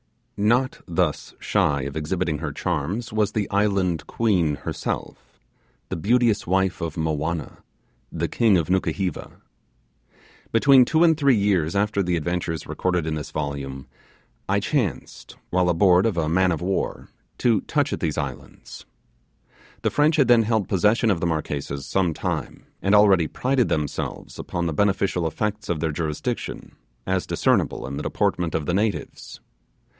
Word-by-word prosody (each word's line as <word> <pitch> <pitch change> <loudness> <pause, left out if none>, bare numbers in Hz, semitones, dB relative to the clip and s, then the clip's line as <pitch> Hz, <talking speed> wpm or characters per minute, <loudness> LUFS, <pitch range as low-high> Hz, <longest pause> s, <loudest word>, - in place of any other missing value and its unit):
Not 120 +6 +1
thus 85 -3 -1
shy 70 -2 +1
of 70 0 -5
exhibiting 80 0 -2
her 75 -2 -3
charms 90 - -3
was 105 -2 +1
the 105 -2 -1
Island 100 -5 +1
Queen 90 -10 +1
herself, - - -6 0.5
the - - -2
beauteous 115 +3 +2
wife 95 +1 +1
of 80 -2 -3
Movianna, 80 0 -2 0.5
the - - -2
king 110 -5 +3
of 80 - -1
Nukuheva. 95 -1 -1 1.2
Between 130 +2 +6
two 160 +6 +3
and 165 -2 +5
three 140 -4 +3
years 95 -6 +1
after 100 0 +1
the 90 -2 0
adventures 85 -1 -2
recorded 90 -3 -1
in 80 - -2
this 75 -2 -5
volume, 70 -3 -4 0.6
I 100 +1 +3
chanced, 110 - -3 0.2
while 90 -1 +2
aboard 90 +3 +4
of 100 -6 -2
a 80 -2 +1
man 90 +3 +2
of 80 - -2
war 95 +2 -2 0.3
to 115 -5 +2
touch 145 -2 0
at - - -3
these 80 -3 -2
islands. 70 -3 -7 1.0
The - - +1
French 150 +2 +3
had 140 -6 +3
then 120 -2 +6
held 110 -3 0
possession 105 +4 +2
of 90 - 0
the 85 - 0
Marquesas 70 -3 -3
some 90 -5 0
time, - - -4 0.2
and 100 +2 +3
already 95 -6 +5
prided 130 - 0
themselves 75 -2 -3
upon 85 0 -3
the 80 - -1
beneficial 95 -2 +1
effects 105 +6 -3
of 85 -3 0
their 80 0 -1
jurisdiction, 75 -1 -4 0.3
as 95 -1 -1
discernible - - +1
in 70 +2 -5
the - - -3
deportment 85 -2 -1
of 80 -2 -1
the 85 - -1
natives. 100 -5 -2
90 Hz, 155 wpm, -23 LUFS, 80-105 Hz, 1.2 s, Between